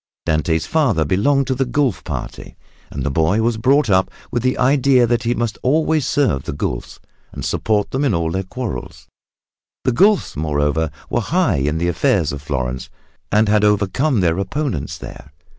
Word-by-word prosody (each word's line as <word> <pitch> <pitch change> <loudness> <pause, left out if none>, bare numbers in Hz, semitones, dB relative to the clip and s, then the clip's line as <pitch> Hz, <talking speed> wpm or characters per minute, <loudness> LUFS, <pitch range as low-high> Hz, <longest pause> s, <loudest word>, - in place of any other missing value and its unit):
Dante's 80 +1 0
father 125 - +1
belonged 135 - +2
to 130 - 0
the 130 +1 0
Guelf 130 -4 0
party - - -7 0.3
and 70 - -5
the 70 - -1
boy 85 +9 +2
was 115 -1 +1
brought 135 +5 +3
up 95 -2 +2 0.2
with 120 - -1
the 130 +1 0
idea 130 -1 +4
that 120 0 +1
he 120 0 0
must 115 -2 -2
always 155 +1 +1
serve 125 - +1
the - - -4
Guelfs, - - -4 0.3
and - - -6
support 105 -2 0
them 135 +2 -1
in 140 - +2
all 80 -1 -1
their 95 +2 -1
quarrels. 95 - -6 0.8
The - - +2
Guelfs, 200 - +3
moreover, 75 +1 0 0.2
were - - +1
high 145 - +1
in 75 +3 0
the 85 +1 0
affairs 85 - +1
of 70 0 -6
Florence 65 -3 -3 0.4
and 105 +1 +3
had 105 0 +3
overcome 105 +5 +2
their 85 0 +1
opponents 100 - -3
there. 75 - -11
105 Hz, 175 wpm, -19 LUFS, 80-130 Hz, 0.8 s, idea